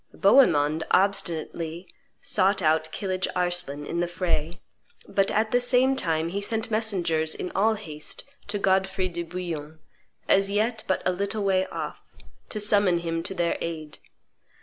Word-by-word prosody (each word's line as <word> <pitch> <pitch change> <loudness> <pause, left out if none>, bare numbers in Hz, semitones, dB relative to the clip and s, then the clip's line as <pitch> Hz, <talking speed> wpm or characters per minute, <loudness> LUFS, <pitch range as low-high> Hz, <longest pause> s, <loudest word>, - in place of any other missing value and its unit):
Bohemond 160 - +4
obstinately 175 -3 -1 0.3
sought 195 0 +2
out 160 -2 +1
Kilidge 185 -2 -2
Arslan 175 -5 -1
in 170 - -3
the 175 - +1
fray; 175 -2 -2 0.5
but 195 -1 +1
at 220 +1 +1
the 245 - +4
same 255 +2 +3
time 165 -8 0
he 200 +3 -3
sent 225 +2 -2
messengers 175 -8 +1
in 180 - -5
all 220 +3 +3
haste 155 -8 -7 0.2
to 205 0 -1
Godfrey 190 -1 +1
de 170 0 -4
Bouillon, 165 -3 -6 0.5
as 195 0 +4
yet 220 +3 0
but 190 - 0
a - - +3
little 200 +3 -2
way 190 -1 +2
off, - - -6 0.5
to 215 - -4
summon 205 -4 +4
him 165 -1 -2
to 190 +3 -4
their 170 -1 0
aid. 155 -2 -5
185 Hz, 150 wpm, -26 LUFS, 165-200 Hz, 0.5 s, Bohemond